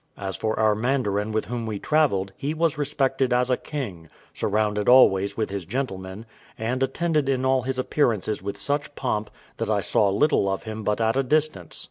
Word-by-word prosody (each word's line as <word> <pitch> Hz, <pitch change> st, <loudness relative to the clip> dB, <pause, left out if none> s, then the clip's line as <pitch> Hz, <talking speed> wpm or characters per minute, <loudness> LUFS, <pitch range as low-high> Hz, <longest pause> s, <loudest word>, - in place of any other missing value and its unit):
As 95 Hz, -2 st, -4 dB
for 110 Hz, +5 st, -2 dB
our 110 Hz, -1 st, +4 dB
mandarin 110 Hz, -3 st, 0 dB
with 110 Hz, 0 st, -1 dB
whom 120 Hz, -1 st, -4 dB
we 105 Hz, -2 st, -3 dB
travelled, 100 Hz, -9 st, +1 dB
he 150 Hz, +3 st, -3 dB
was 165 Hz, -1 st, +1 dB
respected 135 Hz, -3 st, 0 dB
as 125 Hz, +1 st, +2 dB
a -, -, +4 dB
king, 100 Hz, -, -6 dB, 0.2 s
surrounded 105 Hz, 0 st, 0 dB
always 100 Hz, -6 st, +5 dB
with 110 Hz, -3 st, -1 dB
his 100 Hz, -2 st, -3 dB
gentlemen, 95 Hz, -1 st, -4 dB, 0.3 s
and 120 Hz, +4 st, -2 dB
attended 150 Hz, +2 st, 0 dB
in 130 Hz, -1 st, 0 dB
all 130 Hz, 0 st, +3 dB
his 130 Hz, +1 st, -3 dB
appearances 115 Hz, -6 st, 0 dB
with 100 Hz, +1 st, -5 dB
such 145 Hz, +6 st, -2 dB
pomp, 110 Hz, -5 st, -2 dB, 0.3 s
that -, -, -2 dB
I -, -, +2 dB
saw 100 Hz, -, +2 dB
little 100 Hz, 0 st, +2 dB
of 95 Hz, -, -2 dB
him 110 Hz, -1 st, -6 dB
but 105 Hz, +1 st, 0 dB
at 115 Hz, +2 st, +1 dB
a -, -, +4 dB
distance. 145 Hz, -, 0 dB
115 Hz, 190 wpm, -24 LUFS, 100-135 Hz, 0.3 s, always